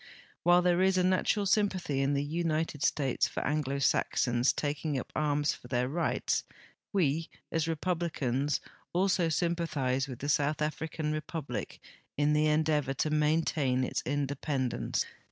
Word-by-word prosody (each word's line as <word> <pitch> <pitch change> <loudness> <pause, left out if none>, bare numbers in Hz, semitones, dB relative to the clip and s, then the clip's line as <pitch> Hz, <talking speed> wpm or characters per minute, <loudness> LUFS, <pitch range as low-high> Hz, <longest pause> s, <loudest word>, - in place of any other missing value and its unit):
While 175 +1 +5
there 175 0 +3
is 190 0 +3
a 180 - +3
natural 190 +3 +2
sympathy 190 -9 +1
in 140 +1 +1
the 140 - +1
United 160 -1 -1
States 135 -4 +1
for - - -4
Anglo 145 -2 0
Saxons 125 -2 +2
taking 145 0 -2
up - - -8
arms 145 -1 +1
for - - -12
their 125 0 0
rights, 165 +3 0 0.5
Ave, 165 -4 +1 0.2
as 165 -1 0
Republicans, 155 -5 -1 0.3
also 180 -1 +2
sympathize 155 -6 0
with 130 -3 -7
the 145 - -5
South 145 +1 +1
African 155 0 -2
Republic 155 - -4 0.4
in 145 +1 +3
the 150 0 +3
endeavor 150 -3 +1
to 150 +3 0
maintain 150 -4 +2
its - - -1
independence. 140 -2 -1
150 Hz, 140 wpm, -30 LUFS, 140-165 Hz, 0.5 s, While